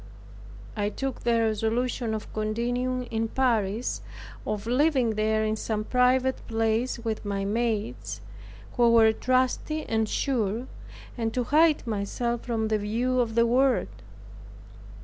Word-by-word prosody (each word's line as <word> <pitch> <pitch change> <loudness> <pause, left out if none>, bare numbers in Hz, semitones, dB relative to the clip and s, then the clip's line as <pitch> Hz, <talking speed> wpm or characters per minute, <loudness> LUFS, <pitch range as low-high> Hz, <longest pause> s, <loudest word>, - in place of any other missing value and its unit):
I 205 -1 0
took 270 +4 -4
the 235 -1 +2
resolution 225 +1 0
of 215 - -7
continuing 245 +4 -1
in 225 0 0
Paris, 225 -3 0 0.5
of 210 0 -2
living 255 -1 +2
there 215 0 +1
in 215 0 0
some 215 -1 -2
private 255 +2 +2
place 225 +2 0
with 225 -2 -4
my 200 -1 -2
maids, 220 0 -2 0.6
who 240 -1 +5
were 225 -1 +6
trusty 255 +6 0
and 220 -1 0
sure, 235 -3 -1 0.5
and 225 -1 0
to 250 - +1
hide 305 +3 +3
myself 230 +2 -2
from 225 -2 -2
the 215 -1 +1
view 240 +5 0
of 225 -2 0
the 235 0 +5
world. 255 +2 +2
230 Hz, 130 wpm, -27 LUFS, 220-250 Hz, 0.6 s, were